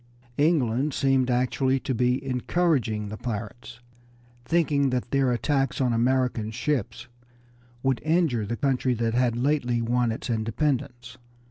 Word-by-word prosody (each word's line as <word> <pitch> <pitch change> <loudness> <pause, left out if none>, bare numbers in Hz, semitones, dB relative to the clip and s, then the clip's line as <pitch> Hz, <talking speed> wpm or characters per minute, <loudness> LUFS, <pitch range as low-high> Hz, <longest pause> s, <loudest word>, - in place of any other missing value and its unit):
England 145 -3 +2
seemed 135 -2 +2
actually 130 +2 +1
to 130 - -3
be 125 +3 0
encouraging 125 -5 0
the 110 - -6
pirates, 120 +2 -6 0.6
thinking 145 -2 +2
that 125 -1 -2
their 135 -2 +2
attacks 135 +2 0
on 125 -3 +1
American 120 -2 +1
ships 120 -1 -3 0.8
would 135 -2 +1
injure 155 - +1
the 120 +2 -3
country 130 -2 +1
that 115 0 -1
had 120 -1 +1
lately 125 -2 +1
won 120 0 +1
its 110 - -5
independence. 120 +2 -2
125 Hz, 130 wpm, -25 LUFS, 120-135 Hz, 0.8 s, England